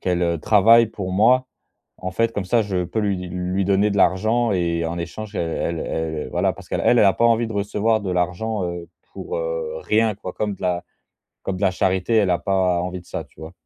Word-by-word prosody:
qu'elle, 90 -1 0
heu, 85 -1 0
travaille 115 +6 +5
pour 100 -4 -6
moi. 125 +7 +4 0.5
En 90 0 -4
fait, 115 +3 +1
comme 100 - -3
ça, 115 +5 +2
je 95 -3 -2
peux 90 +6 -2
lui 100 -2 0
di 90 0 -6
lui 90 +2 -2
donner 100 +2 +2
de 100 - -2
l'argent 110 +5 +2
et 85 -2 0
en 85 +1 -4
échange, 100 +5 -6
elle 85 - -1
elle 85 0 -2
elle, 80 -1 -3
voilà, - - +1
parce - - -14
qu'elle - - -2
elle 120 - +5
a 100 -2 +5
pas 115 - 0
envie 115 0 +3
de - - -6
recevoir 105 +2 0
de 100 -2 -4
l'argent, 90 +4 -1
heu, 85 -1 -5 0.2
pour, 455 +5 -5
heu, - - -3
rien 110 0 +1
quoi 95 -2 -7
comme 105 -1 -2
de - - -15
la 90 -1 -1 0.6
comme 95 - -2
de 95 - -8
la 95 - +4
charité. 95 +4 +1
Elle 100 -4 +3
a 90 - +2
pas 95 -2 +1
envie 90 +1 -4
de 85 - -19
ça, - - -5
tu - - -28
vois? 80 +1 -9
95 Hz, 235 wpm, -22 LUFS, 90-110 Hz, 0.6 s, travaille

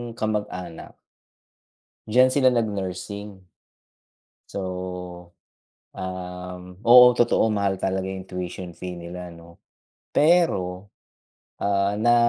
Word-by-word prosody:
kamag-anak. 105 -6 -4 1.1
Diyan 125 +4 +5
sila 130 -2 +4
nag 115 -2 +1
nursing. 100 +1 -6 1.1
So, 100 - -5 1.3
um, 90 0 -6 0.2
oo, 125 +2 +9
totoo 120 -2 +2
mahal 100 -2 0
talaga 95 0 -2
yung 95 -1 -6
tuition 90 -1 -6
fee 90 +1 -7
nila 90 +1 -8
'no. 85 0 -15 0.6
Pero, 100 - +2 0.7
ah, 100 0 +1
na. 120 +2 +4
95 Hz, 95 wpm, -24 LUFS, 90-110 Hz, 1.3 s, oo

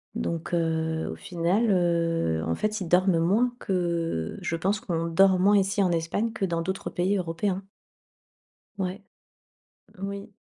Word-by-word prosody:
donc, 165 0 -3
heu, 160 -1 0
au - - -6
final, 180 +6 0
heu, 165 - +1
en 80 - 0
fait 215 0 -2
ils 180 - -3
dorment 180 -1 +4
moins 215 +9 +2
que 170 - -1
je 165 - -2
pense 195 +6 0
qu'on 165 -2 -2
dort 190 +3 +5
moins 205 +3 +5
ici 195 +1 +2
en 180 - +2
Espagne 170 +7 -1
que 210 -3 -1
dans 170 -2 -1
d'autres 190 +2 -3
pays 190 +3 +1
européens. 185 +2 -2 1.1
Ouais. 190 +1 -3 1.0
Oui. 200 +2 -5
180 Hz, 150 wpm, -26 LUFS, 165-195 Hz, 1.1 s, dort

